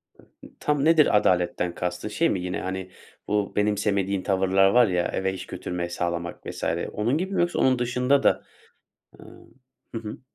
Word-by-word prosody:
Hı - - -21
ı, - - -18
tam 150 -1 0
nedir 155 -9 +5
adaletten 90 -3 +1
kastın? 90 +2 -3
Şey 165 +10 +1
mi 95 - -1
yine, 90 0 -3
hani, 95 0 -5 0.4
bu 105 -1 -1
benimsemediğin 100 -2 0
tavırlar 95 0 +3
var 120 +2 +5
ya, 90 -2 0
eve 95 0 -2
iş 95 - -7
götürmeyi 85 -1 -4
sağlamak 85 0 -4
vs. - - -7 0.3
onun 115 +7 0
gibi 190 +4 -3
mi - - +2
yoksa 175 0 0
onun 130 -1 +3
dışında 125 +3 +1
da - - +3 0.8
Hımm. - - -16 0.4
Hı 115 - -1
hı. 105 -1 -8
100 Hz, 175 wpm, -25 LUFS, 90-125 Hz, 0.8 s, nedir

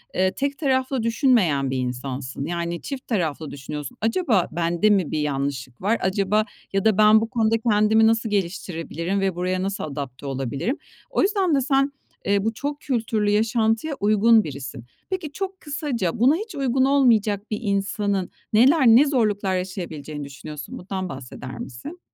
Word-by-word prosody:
eee, 185 0 +2
tek 280 0 -2
taraflı 260 -3 0
düşünmeyen 215 - +2
bir 130 - -1
insansın. 130 +2 -4
Yani, 170 0 -3
çift 275 -2 -6
taraflı 160 - -2
düşünüyorsun, 145 +1 -7
acaba 225 - +2
bende 170 +4 +1
mi 195 -7 +2
bir 155 - -1
yanlışlık 135 -3 -3
var? 215 +4 +2
Acaba 200 +3 +1 0.3
ya 195 +2 0
da 215 -2 +4
ben 215 +1 +6
bu 225 - -2
konuda 225 -2 +2
kendimi 215 +1 +4
nasıl 225 0 +1
geliştirebilirim 180 -1 -2
ve 190 -2 0
buraya 185 +1 -1
nasıl 195 +1 -3
adapte 140 -3 -6
olabilirim? 135 - -2 0.3
O - - +1
yüzden 380 -5 +2
de 270 - +2
sen, 275 +1 +2 0.3
eee, 200 0 +2
bu 225 - 0
çok 285 +5 -4
kültürlü 220 -5 0
yaşantıya 225 +6 +1
uygun 215 +2 +5
birisin. 135 -4 -7 0.2
Peki, 365 -6 -3
çok 385 +2 -5
kısaca, 270 - -2
buna 265 +6 +5
hiç 430 +4 -6
uygun 265 -1 +2
olmayacak 225 -7 +2
bir 210 - -1
insanın 200 -2 -1 0.2
neler, 265 +6 +5
ne 240 +6 +7
zorluklar 210 -8 +1
yaşayabileceğini 160 -5 -5
düşünüyorsun? 145 +2 -8
Bundan 185 0 -4
bahseder 130 -1 -8
misin? 135 - -8
205 Hz, 155 wpm, -23 LUFS, 165-240 Hz, 0.3 s, ne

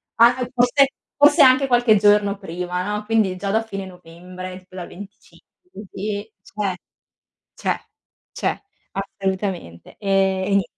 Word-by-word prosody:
anche 245 +2 +4
forse 250 +3 +4 0.3
forse 290 +2 +6
anche 265 0 +6
qualche 245 -3 +4
giorno 205 0 +3
prima, 180 -1 -4
no, 210 +1 -3
quindi 210 -4 +1
già 200 +1 -3
da 220 +3 +2
fine 195 -3 -6
novembre, 180 +1 -10
tipo 185 0 -19
dal 180 -2 -6
25 205 - -15
così, 205 - -6
cioè, 200 -1 -3 0.8
cioè, - - -1 0.5
cioè, - - -2 0.3
assolutamente, 190 - -4
ehm, 195 -2 +1
e 190 - -2
nien 200 -1 +3
200 Hz, 135 wpm, -21 LUFS, 185-225 Hz, 0.8 s, forse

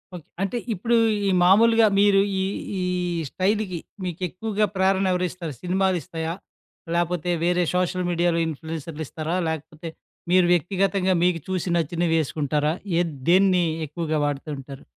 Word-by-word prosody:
Okay. 165 - -10 0.2
అంటే 200 +5 -1 0.2
ఇప్పుడు 235 +6 0 0.3
ఈ - - +3
మామూలుగా 225 +4 +6
మీరు 200 -1 +5 0.2
ఈ - - +1 0.4
ఈ - - -1 0.5
స్టైల్‌కి 190 -2 -1 0.2
మీకెక్కువగా 185 +5 -2
ప్రేరణ 190 +1 +2
ఎవరిస్తారు? 180 -3 -3
సినిమాలిస్తాయా, 180 -3 -1 0.6
లాకపోతే 175 0 -1 0.2
వేరే 180 0 +2
సోషల్ 180 0 0
మీడియాలో 170 0 +1
ఇన్ఫ్లుయెన్సర్లిస్తారా? 160 +1 -5
లాకపోతే 160 +1 -5 0.4
మీరు 185 -1 +5
వ్యక్తిగతంగా 190 +2 +1
మీకు 180 -2 +2
చూసి, 185 -1 -2
నచ్చినవి 170 +1 0
వేసుకుంటారా? 150 +1 0 0.3
ఏ - - +4 0.3
దేన్ని 185 -1 +4 0.2
ఎక్కువగా 155 0 -2
వాడుతూ 145 +1 -3
ఉంటారు? 135 0 -10
175 Hz, 120 wpm, -24 LUFS, 160-190 Hz, 0.6 s, మామూలుగా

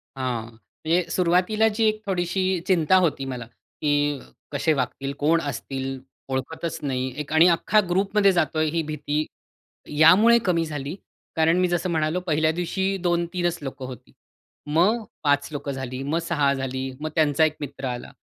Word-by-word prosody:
हां. 125 -4 -3
म्हणजे 160 +9 -2
सुरुवातीला 185 +5 +2
जी 220 +1 +1
एक 215 0 0
थोडीशी 185 0 -1 0.2
चिंता 180 -2 +3
होती 140 -4 -2
मला, 125 -3 -5
की 145 +4 -2 0.3
कसे 150 +2 +1
वागतील? 135 0 -3
कोण 165 +3 +3
असतील? 135 -2 -4 0.3
ओळखतच 160 +5 -3
नाही. 130 +1 -2
आणि 160 +2 +6
अख्खा 175 +5 +3
ग्रुपमध्ये 195 +2 +3
जातोय 155 -2 +1
ही 165 +1 0
भीती, 150 0 -2 0.7
यामुळे 205 +9 +7
कमी 170 -3 +2
झाली 145 0 -5 0.4
कारण 160 +2 +3
मी 185 - +3
जसं 175 0 -1
म्हणालो 160 +1 0
पहिल्या 155 0 +2
दिवशी 190 +3 -1
2-3च 175 0 0
लोकं 135 -1 -6
होती. 125 -3 -10 0.6
मग 185 +10 +2 0.2
5 145 -1 +2
लोकं 145 -1 -4
झाली, 130 -1 -5
मग 150 +4 0
6 150 -5 +1
झाली, 130 0 -3
मग 155 - -2
त्यांचा 155 -1 +3
1 155 -1 -1
मित्र 140 -1 -6
आला. 120 -1 -5
155 Hz, 150 wpm, -24 LUFS, 140-175 Hz, 0.7 s, यामुळे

